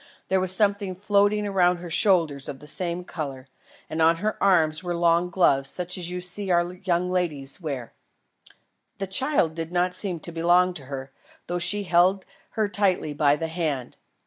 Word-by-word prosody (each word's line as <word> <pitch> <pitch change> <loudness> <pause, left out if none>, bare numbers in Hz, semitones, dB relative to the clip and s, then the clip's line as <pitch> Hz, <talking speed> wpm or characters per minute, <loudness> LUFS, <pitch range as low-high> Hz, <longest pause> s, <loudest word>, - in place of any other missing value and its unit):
There 190 - +2
was 185 -1 +4
something 200 -1 +1
floating 205 +2 +1
round 180 -3 +2
her 175 -1 -9
shoulders 160 -7 +1
of 135 - -6
the 150 - -13
same 175 +3 -1
colour, 140 -7 -7 0.4
and 160 - -3
on 165 +1 +5
her 210 +5 -2
arms 165 -5 +3
were 175 -1 -3
long 170 +1 +2
gloves 135 -7 +2
such 180 0 -3
as 175 -2 -4
you 180 0 -5
see 185 +2 -2
our 175 0 +1
young 180 -1 -1
ladies 170 -5 -2
wear. 135 -7 -5 1.0
The 195 - -3
child 190 - +1
did 165 0 -5
not 180 0 0
seem 180 -2 -4
to 170 - -7
belong 175 +2 +3
to 145 -6 -8
her, 135 0 -7 0.3
though 175 +1 -3
she 205 +4 +6
held 185 +1 +2 0.3
her 215 -1 +2
tightly 195 -7 0
by 145 -1 +3
the 160 +2 -4
hand. 155 -7 -3
175 Hz, 180 wpm, -24 LUFS, 160-185 Hz, 1.0 s, she